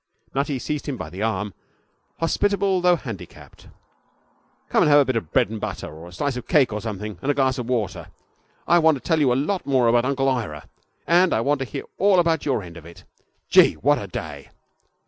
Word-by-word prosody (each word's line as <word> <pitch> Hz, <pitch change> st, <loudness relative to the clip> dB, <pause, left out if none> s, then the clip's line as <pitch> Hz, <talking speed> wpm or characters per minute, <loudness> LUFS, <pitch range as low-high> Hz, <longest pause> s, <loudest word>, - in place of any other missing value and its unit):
Nutty 140 Hz, 0 st, -1 dB
seized 150 Hz, +4 st, -4 dB
him 140 Hz, -3 st, -3 dB
by 80 Hz, -, -7 dB
the 95 Hz, +3 st, -7 dB
arm, 105 Hz, -2 st, -2 dB, 0.7 s
hospitable 195 Hz, +2 st, +1 dB
though 180 Hz, 0 st, +4 dB
handicapped. 115 Hz, -, -10 dB, 1.0 s
'Come -, -, +2 dB
and -, -, +4 dB
have 145 Hz, -, +7 dB
a -, -, +2 dB
bit 130 Hz, -, -1 dB
of 85 Hz, -9 st, -3 dB
bread -, -, +2 dB
and 110 Hz, -, -6 dB
butter, -, -, -5 dB
or 80 Hz, +2 st, -11 dB
a -, -, -12 dB
slice 140 Hz, +9 st, -2 dB
of 125 Hz, -, -7 dB
cake 145 Hz, -9 st, +3 dB
or 105 Hz, -, -3 dB
something, 105 Hz, -3 st, -6 dB
and 140 Hz, -, -3 dB
a 145 Hz, -, +2 dB
glass 130 Hz, -1 st, +1 dB
of 120 Hz, 0 st, -5 dB
water. 115 Hz, -7 st, -2 dB, 0.6 s
I 175 Hz, -, +5 dB
want 160 Hz, -2 st, +4 dB
to -, -, -15 dB
tell 160 Hz, -2 st, +1 dB
you 140 Hz, -4 st, +3 dB
a -, -, +2 dB
lot 180 Hz, +9 st, -1 dB
more 130 Hz, -3 st, +3 dB
about 120 Hz, +1 st, +3 dB
Uncle 135 Hz, 0 st, 0 dB
Ira, 110 Hz, -, -2 dB, 0.4 s
and 175 Hz, +1 st, +4 dB
I 110 Hz, -, +1 dB
want 145 Hz, +3 st, +1 dB
to 135 Hz, -, -2 dB
hear 105 Hz, -, -6 dB, 0.2 s
all 195 Hz, 0 st, +4 dB
about 165 Hz, -4 st, +1 dB
your 130 Hz, -7 st, 0 dB
end 85 Hz, -1 st, -11 dB
of 80 Hz, -, -12 dB
it. 85 Hz, +1 st, -14 dB, 0.4 s
Gee, -, -, +6 dB
what -, -, +2 dB
a -, -, -6 dB
day!' -, -, -7 dB
130 Hz, 225 wpm, -23 LUFS, 105-150 Hz, 1.0 s, have